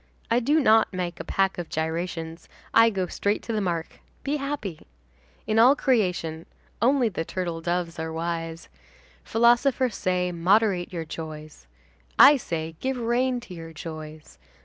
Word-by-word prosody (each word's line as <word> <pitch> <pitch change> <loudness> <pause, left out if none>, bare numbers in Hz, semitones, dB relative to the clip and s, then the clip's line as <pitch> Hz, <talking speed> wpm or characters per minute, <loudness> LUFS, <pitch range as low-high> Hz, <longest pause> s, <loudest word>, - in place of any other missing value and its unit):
I 235 - +4
do 290 +6 +2
not 220 -5 +4
make 180 -2 -4
a - - -4
pack 195 -1 0
of 170 - -5
gyrations, 165 +1 -4 0.2
I 230 0 +7
go 190 -4 -2
straight 200 +3 -1
to 230 - -4
the 215 - 0
mark, 170 -4 -3 0.2
be 290 +2 -1
happy. 275 - -5 0.6
In 220 +1 +1
all 255 +5 +7
creation, 180 - 0 0.3
only 255 0 +3
the 175 -6 -3
turtledoves 170 -1 -3
are 160 0 -3
wise. 165 0 -4 0.6
Philosophers 240 +1 +3
say: 180 -1 0
'Moderate 185 +1 +2
your 165 -3 -4
joys.' 155 - -9 0.5
I 290 - +9
say: 160 -8 -5
'Give 265 0 -2
rein 245 +2 0
to 210 - -11
your 165 -1 -9
joys. 155 -1 -9
180 Hz, 150 wpm, -25 LUFS, 165-230 Hz, 0.6 s, I